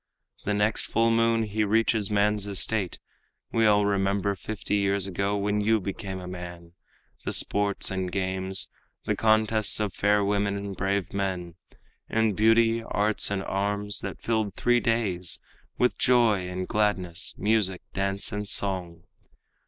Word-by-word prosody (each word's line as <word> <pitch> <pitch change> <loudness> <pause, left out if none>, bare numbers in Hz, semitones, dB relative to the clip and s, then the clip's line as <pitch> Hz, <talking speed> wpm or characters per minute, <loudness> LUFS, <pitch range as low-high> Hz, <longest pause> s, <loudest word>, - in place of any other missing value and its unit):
The 105 - 0
next 105 +2 +1
full 115 0 +2
moon 115 0 +2
he 105 0 -1
reaches 110 0 +1
man's 105 0 +1
estate. 100 -1 -1 0.5
We 115 -1 +3
all 105 -1 +4
remember 100 0 +1
fifty 105 +1 -3
years 100 -1 +1
ago 100 +2 -1
When 105 +1 0
you 110 +1 +3
became 95 0 -5
a 90 - -8
man, 85 -1 -8 0.5
the - - -2
sports 100 -1 0
and 95 -1 -2
games, 95 0 0 0.4
The - - 0
contests 110 -1 +2
of 105 -4 -1
fair 105 +1 +2
women 100 0 0
and 100 -1 -5
brave 95 +1 -1
men, 95 -3 -3 0.6
In 110 -1 +2
beauty, 115 +2 +3
arts 105 -1 +1
and 100 -1 -2
arms, 100 +1 -1
that 100 - -6
filled 110 -4 -1
three 120 0 +3
days 105 -8 0 0.4
With 125 - +1
joy 115 -7 +3
and 90 0 -4
gladness, 95 -5 -1
music, 105 -4 +1
dance 100 +1 -1
and 105 0 -4
song. 90 -5 0
100 Hz, 145 wpm, -26 LUFS, 95-110 Hz, 0.6 s, all